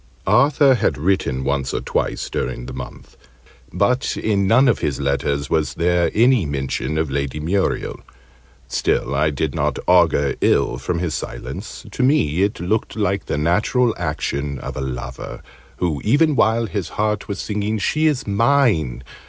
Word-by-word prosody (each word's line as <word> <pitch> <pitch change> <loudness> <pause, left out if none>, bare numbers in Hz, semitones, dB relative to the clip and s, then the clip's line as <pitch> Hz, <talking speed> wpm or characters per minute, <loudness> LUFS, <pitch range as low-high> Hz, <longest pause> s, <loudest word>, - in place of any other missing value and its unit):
Arthur 135 +6 +4
had 100 - 0
written 75 -6 0
once 70 -1 -1
or - - 0
twice - - -2
during - - -3
the - - -7
month; - - -9 0.6
but 125 +2 0
in 100 -3 +1
none 130 +6 +5
of 120 - +2
his 70 -3 -2
letters 70 +1 -1
was 80 -1 0
there 85 0 +2
any 120 0 +4
mention 70 +1 -2
of 80 -3 -1
Lady 70 +1 -2
Muriel. 95 +6 -1 0.7
Still, 60 - 0
I 75 +3 +2
did 75 -1 -2
not - - -1
augur 70 -1 +4
ill 60 - +2
from 85 +6 -2
his 85 -2 -2
silence: - - -6
to - - -3
me 125 - +2
it 100 +2 0
looked 105 +6 -1
like 100 -3 -1
the - - -1
natural 105 - +2
action 70 0 -3
of - - -7
a - - -4
lover, 65 -2 -6 0.3
who, 85 -5 -1
even 145 +6 +3
while 115 -1 +3
his 100 -6 -4
heart 105 -1 0
was 100 - -4
singing 105 +1 -2
"She 155 +10 +1
is 145 -4 0
mine!" 105 - +2
90 Hz, 160 wpm, -20 LUFS, 70-110 Hz, 0.7 s, none